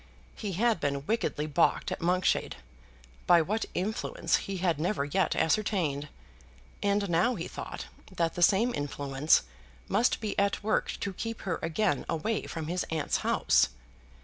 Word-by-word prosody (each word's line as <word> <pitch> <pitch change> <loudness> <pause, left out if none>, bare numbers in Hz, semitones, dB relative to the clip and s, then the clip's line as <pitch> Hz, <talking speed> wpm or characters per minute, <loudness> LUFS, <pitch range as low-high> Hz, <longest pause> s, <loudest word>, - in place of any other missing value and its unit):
He 205 -3 -5
had 225 +2 +2
been 140 -1 -2
wickedly 220 -8 -1
baulked 155 +2 +1
at - - -4
Monkshade, 180 +2 +1 0.7
by 175 - +7
what 215 +7 -1
influence 205 +5 0
he 195 -1 -5
had 175 -4 0
never 170 -2 0
yet 180 +5 +1
ascertained; 160 -5 0 0.7
and 200 0 +1
now 175 +8 +2
he 170 -4 -4
thought - - -7 0.3
that 170 -3 0
the 175 - -5
same 210 +8 +4
influence 145 - +1 0.4
must 240 - +2
be 215 -2 -2
at 200 +1 +1
work 215 - +1
to 195 - -2
keep 225 +4 -5
her 175 -4 -2
again 165 -2 0
away 210 +8 -1
from 160 -2 -5
his 175 +3 -1
aunt's 160 -2 0
house. - - +3
180 Hz, 150 wpm, -29 LUFS, 155-205 Hz, 0.7 s, by